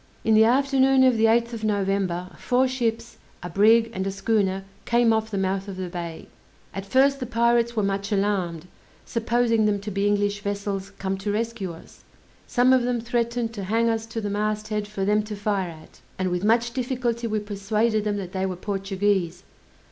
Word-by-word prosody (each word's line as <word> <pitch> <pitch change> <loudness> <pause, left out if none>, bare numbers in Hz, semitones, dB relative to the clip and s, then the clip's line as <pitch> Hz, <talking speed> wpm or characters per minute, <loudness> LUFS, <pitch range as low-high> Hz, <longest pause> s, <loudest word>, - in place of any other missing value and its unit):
In 225 - +3
the 220 +1 +6
afternoon 270 +1 +4
of 255 -2 +5
the 225 0 +3
8th 235 +1 +2
of 225 -1 -6
November, 195 -3 -1
four 255 +1 +1
ships, 230 -3 -3 0.2
a 175 - -6
brig 225 +4 +4
and 190 -1 -2
a - - 0
schooner 195 -1 0 0.2
came 235 -1 +3
off 220 0 0
the 205 - -3
mouth 195 +1 -1
of 195 -2 -7
the 185 -1 -4
bay. 170 -2 -6 0.5
At 195 0 -6
first 275 +4 +3
the 250 - -4
pirates 235 0 +2
were 215 - +1
much 200 +1 -2
alarmed, 190 -5 -1 0.4
supposing 230 -1 +1
them 205 -1 +1
to 210 +1 -5
be 200 +1 0
English 205 0 0
vessels 200 -1 -3
come 190 0 -3
to 205 +1 -2
rescue 215 -3 -2
us. 165 - -14 0.4
Some 250 +1 +4
of 260 - +4
them 245 0 0
threatened 235 0 -1
to 200 -4 -5
hang 230 +4 +2
us 225 0 -1
to 225 - -4
the 205 -2 -3
mast 215 +1 -2
head 210 -1 -2
for 200 -2 -3
them 210 +1 +3
to 210 0 -6
fire 200 -3 -1
at; 160 -1 -14 0.2
and 185 -1 -1
with 180 +1 -1
much 230 +2 +2
difficulty 245 -2 -2
we 215 -1 -1
persuaded 210 +2 0
them 205 -1 -1
that 185 -3 -5
they 190 0 -1
were 185 - -3
Portuguese. 195 -2 -1
210 Hz, 200 wpm, -24 LUFS, 195-230 Hz, 0.5 s, the